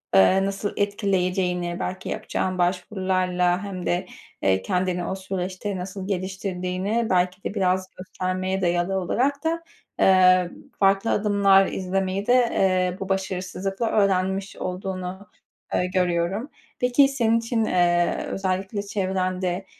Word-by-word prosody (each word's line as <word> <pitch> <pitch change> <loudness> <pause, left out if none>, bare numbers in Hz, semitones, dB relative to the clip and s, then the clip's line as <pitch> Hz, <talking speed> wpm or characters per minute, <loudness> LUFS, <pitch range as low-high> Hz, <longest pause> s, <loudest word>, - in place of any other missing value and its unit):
ııı, 185 - +5
nasıl 195 +1 -3
etkileyeceğini, 185 -3 0
belki 185 +1 -4
yapacağın 185 0 -2
başvurularla 180 0 0
hem 190 -3 -5
de, 175 +2 0 0.4
ııı, 95 -1 +3
kendini 180 - -1
o 190 - -2
süreçte 190 +1 -4
nasıl 185 +1 -6
geliştirdiğini, 190 +3 -2
belki 180 +2 +1
de - - -3
biraz 185 -2 +1
göstermeye 185 +1 -3
dayalı 175 +1 +1
olarak 255 +10 +1
da, 330 +1 -1 0.4
ııı, 185 -1 +5 0.3
farklı 195 +2 +3
adımlar 200 -2 +4
izlemeyi 190 +1 -2
de, 245 - +5 0.6
ııı, 185 - -12
bu 195 - -5
başarısızlıkla 190 +2 -2
öğrenmiş 195 -1 +1
olduğunu 185 +1 -5 0.5
ı - - +2
görüyorum. 180 - 0 0.3
Peki 250 +3 +4
senin 230 -4 +2
için, 230 -1 0
ııı, 175 -2 +2
özellikle 190 +1 -2
çevrende 185 -2 -2
190 Hz, 120 wpm, -24 LUFS, 180-195 Hz, 0.6 s, ııı